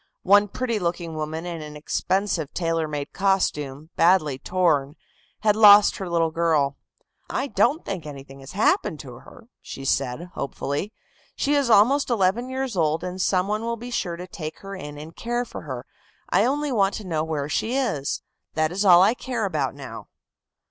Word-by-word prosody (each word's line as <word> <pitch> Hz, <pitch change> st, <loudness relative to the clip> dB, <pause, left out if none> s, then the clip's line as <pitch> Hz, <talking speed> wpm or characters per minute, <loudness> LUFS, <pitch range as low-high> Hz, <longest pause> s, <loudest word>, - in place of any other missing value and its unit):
One 205 Hz, +2 st, +5 dB
pretty 235 Hz, +1 st, -2 dB
looking 170 Hz, -2 st, -2 dB
woman 155 Hz, +2 st, -4 dB
in 170 Hz, -2 st, -5 dB
an 150 Hz, 0 st, -8 dB
expensive 180 Hz, +1 st, -1 dB
tailor 165 Hz, -2 st, 0 dB
made 145 Hz, -2 st, -5 dB
costume 155 Hz, -6 st, 0 dB
badly 165 Hz, -6 st, +3 dB
torn, 155 Hz, -5 st, +1 dB, 0.5 s
had 210 Hz, -1 st, +3 dB
lost 210 Hz, -1 st, +7 dB
her 190 Hz, -2 st, -5 dB
little 165 Hz, -1 st, +1 dB
girl. 160 Hz, -4 st, +1 dB, 0.5 s
"I -, -, -1 dB
don't 295 Hz, +3 st, +1 dB
think 185 Hz, -6 st, -5 dB
anything 135 Hz, -1 st, -10 dB
has 135 Hz, +4 st, -11 dB
happened 205 Hz, -, +1 dB
to 125 Hz, -4 st, -11 dB
her," 235 Hz, -2 st, -16 dB
said 130 Hz, -2 st, -2 dB
she, -, -, -7 dB
hopefully. 140 Hz, +7 st, -3 dB, 0.4 s
"She 290 Hz, -, 0 dB
is 285 Hz, -4 st, +2 dB
almost 250 Hz, +7 st, +5 dB
eleven 230 Hz, +2 st, +1 dB
years 260 Hz, -3 st, -3 dB
old, 160 Hz, -1 st, +1 dB
and 185 Hz, +1 st, -4 dB
some 185 Hz, 0 st, +2 dB
one 210 Hz, +1 st, -1 dB
will 230 Hz, 0 st, -2 dB
be 245 Hz, +2 st, -8 dB
sure 175 Hz, -7 st, -2 dB
to 180 Hz, +1 st, -7 dB
take 160 Hz, -4 st, -7 dB
her 195 Hz, 0 st, -7 dB
in 150 Hz, -6 st, -8 dB
and 155 Hz, +3 st, -10 dB
care 240 Hz, +1 st, -2 dB
for -, -, -8 dB
her; -, -, -6 dB, 0.5 s
I -, -, +4 dB
only 290 Hz, +3 st, 0 dB
want 200 Hz, -4 st, +2 dB
to 215 Hz, -, -7 dB
know 160 Hz, -4 st, -1 dB
where 155 Hz, -3 st, -2 dB
she 225 Hz, -, -1 dB
is. 150 Hz, -, -1 dB, 0.3 s
That 155 Hz, 0 st, +1 dB
is 195 Hz, +3 st, -1 dB
all 180 Hz, -2 st, +8 dB
I 210 Hz, -, +4 dB
care 245 Hz, -3 st, -3 dB
about 150 Hz, -8 st, -1 dB
now." 130 Hz, -5 st, -9 dB
180 Hz, 185 wpm, -24 LUFS, 155-210 Hz, 0.5 s, all